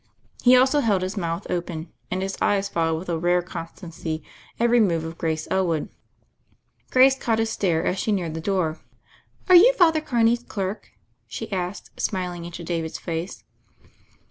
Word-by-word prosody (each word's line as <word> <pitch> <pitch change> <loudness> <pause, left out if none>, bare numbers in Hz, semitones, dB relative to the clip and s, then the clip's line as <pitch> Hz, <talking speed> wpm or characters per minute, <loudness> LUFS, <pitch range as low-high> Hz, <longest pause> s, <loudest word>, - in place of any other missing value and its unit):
He 250 0 +7
also 265 +3 +4
held 205 -8 +1
his 185 +3 -3
mouth 170 -1 -3
open, 170 -2 -4 0.2
and 185 +1 -2
his 195 0 -3
eyes 200 -1 +2
followed 165 -2 0
with 175 +3 -7
a 165 -1 -1
rare 175 +1 +2
con 170 -2 -6
stancy 165 -3 -6 0.4
every 235 +1 +4
move 170 -7 +2
of 165 +1 -6
Grace 160 -1 -2
Elwood. 170 -5 0 1.0
Grace 260 +1 +6
caught 230 -4 0
his 225 0 0
stare 175 -7 0
as 185 - 0
she 215 - 0
neared 175 -6 -1
the 160 - -5
door. 175 -4 -1 0.7
"Are 370 - +5
you 415 +8 +8
Father 325 -7 +4
Carney's 240 -5 +2
clerk?" 200 -3 -5 0.4
she 170 - -7
asked, 185 0 -4
smiling 180 -4 -2
into 170 0 -8
David's 165 -2 -3
face. 170 +2 -5
185 Hz, 170 wpm, -24 LUFS, 165-225 Hz, 1.0 s, you